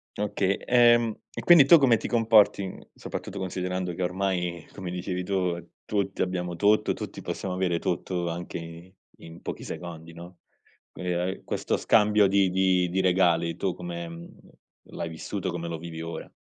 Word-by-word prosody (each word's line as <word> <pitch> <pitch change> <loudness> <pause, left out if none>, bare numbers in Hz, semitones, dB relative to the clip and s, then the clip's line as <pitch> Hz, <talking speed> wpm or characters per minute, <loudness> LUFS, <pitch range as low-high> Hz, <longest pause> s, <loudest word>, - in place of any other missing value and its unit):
Oka 105 -1 -1
ehm, 120 +2 +4 0.2
e - - -6
quindi 170 -6 +7
tu 170 - +9
come 130 -6 +4
ti 110 - -5
comporti 110 -4 +4
in 95 - -7
soprattutto 100 - -7
considerando 90 -1 -3
che 90 - -6
ormai 90 -2 -1
come 95 -3 -6
dicevi 90 0 -3
tu, 90 -3 -2 0.2
tutti 100 -2 -2
abbiamo 90 -1 -3
tutto, 105 +4 +3
tutti - - -7
possiamo 95 -2 -4
avere 90 -2 0
tutto, 90 0 -2
anche 85 +1 -5
i 85 +2 -10 0.3
in 80 +1 -12
pochi - - -6
secondi, 85 -1 -8
no. 85 +2 -11 0.5
Quindi, 90 -1 -3
uhm, 90 +2 -2
questo - - -1
scambio 105 -1 +4
di 95 -1 +3
di 95 -1 +2
di 95 +2 0
regali 85 -3 +2
tu 95 -2 -1
come, 85 -1 -6
mhmm, 85 0 -9 0.6
l'hai 85 - -4
vissuto, 80 - -4
come 85 - -4
lo 85 - -4
vivi 80 0 -7
ora? 85 0 -7
90 Hz, 170 wpm, -26 LUFS, 85-100 Hz, 0.6 s, tu